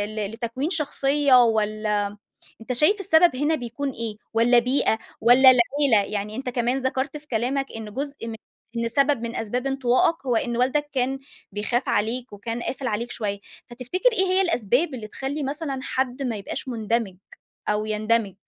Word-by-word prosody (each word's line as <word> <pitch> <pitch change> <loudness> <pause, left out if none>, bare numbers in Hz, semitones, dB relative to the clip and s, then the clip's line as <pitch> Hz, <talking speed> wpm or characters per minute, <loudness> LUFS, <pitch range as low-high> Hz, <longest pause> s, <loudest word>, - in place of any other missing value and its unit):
ل 210 -2 -2
لتكوين 235 +6 -3
شخصيّة 280 -5 +3
والّا 215 -2 +1
امم 205 - -1 0.5
أنت 225 +3 -4
شايف 305 - +3
السبب 335 -5 +4
هنا 295 +4 +1
بيكون 255 +1 -4
إيه؟ 230 -4 -5 0.2
والّا 235 +2 +5
بيئة؟ 250 -2 +2 0.2
والّا 250 +4 +7
العيلة؟ 250 -3 +2
يعني 210 +1 -3
أنت 260 0 -4
كمان 245 +1 0
ذكَرْت 265 +2 -2
في 300 0 -9
كلامك 260 +3 -1
إن 215 -2 -8
جزء 280 -2 -5
من 225 - -5 0.4
إن 230 0 0
سبب 275 +1 +2
من 235 0 -4
أسباب 245 +4 -2
انطوائك 270 +5 +2
هو 245 -2 +2
إن 235 +1 -1
والدك 270 +4 +1
كان 265 0 0 0.3
بيخاف 225 +5 -1
عليك 235 +4 -1
وكان 230 +4 -5
قافل 265 +1 -4
عليك 235 +1 -2
شويّة، 205 -3 -3 0.3
فتفتكر 255 - 0
إيه 385 -4 +2
هي 370 +1 +2
الأسباب 285 - +1
اللي 220 -4 -7
تخلّي 275 +6 -4
مثلًا 280 0 -3
حد 260 0 -2
ما 245 -4 -2
يبقاش 205 +5 -6
مُندمج 225 -4 -1 0.5
أو 210 0 0
يندمج؟ 215 -1 0
245 Hz, 170 wpm, -24 LUFS, 225-275 Hz, 0.5 s, والّا